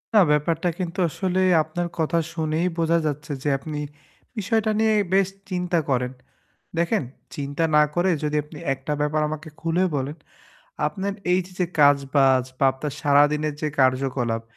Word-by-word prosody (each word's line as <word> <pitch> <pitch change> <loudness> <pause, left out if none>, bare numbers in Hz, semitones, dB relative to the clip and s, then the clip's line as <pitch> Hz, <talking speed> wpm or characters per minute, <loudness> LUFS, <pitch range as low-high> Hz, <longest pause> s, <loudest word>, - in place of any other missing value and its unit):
না, - - +8
ব্যাপারটা 160 +4 +1
কিন্তু 180 0 -4
আসলে 185 +3 -1 0.2
আপনার 170 +3 -3
কথা 165 +1 +1
শুনেই 160 +1 -1
বোঝা 165 0 +2
যাচ্ছে 150 +1 -3
যে, 150 - +1
আপনি 150 +1 -6 0.6
বিষয়টা 220 +1 +1
নিয়ে 220 0 +3 0.2
বেশ 195 -1 +4 0.2
চিন্তা 180 -2 0
করেন। 125 -1 0 0.7
দেখেন 170 +4 +1 0.3
চিন্তা 145 +2 -2
না 150 - +7
করে 180 +2 +2
যদি 150 0 -1
আপনি 150 +1 -12 0.2
একটা 135 +2 -4
ব্যাপার 150 +1 +1
আমাকে 155 +1 -6
খুলে 170 +3 +1
বলেন। 140 +3 -3 0.7
আপনার 200 0 -3 0.2
এই 185 - +4
যে 185 - -15
যে, 180 - +2 0.2
কাজ-বাজ 140 -2 +4
বা - - +2
আপনার 140 +2 -5
সারাদিনের 145 +1 +3
যে 155 - 0
কার্যকলাপ 130 -3 +1
155 Hz, 150 wpm, -24 LUFS, 145-175 Hz, 0.7 s, না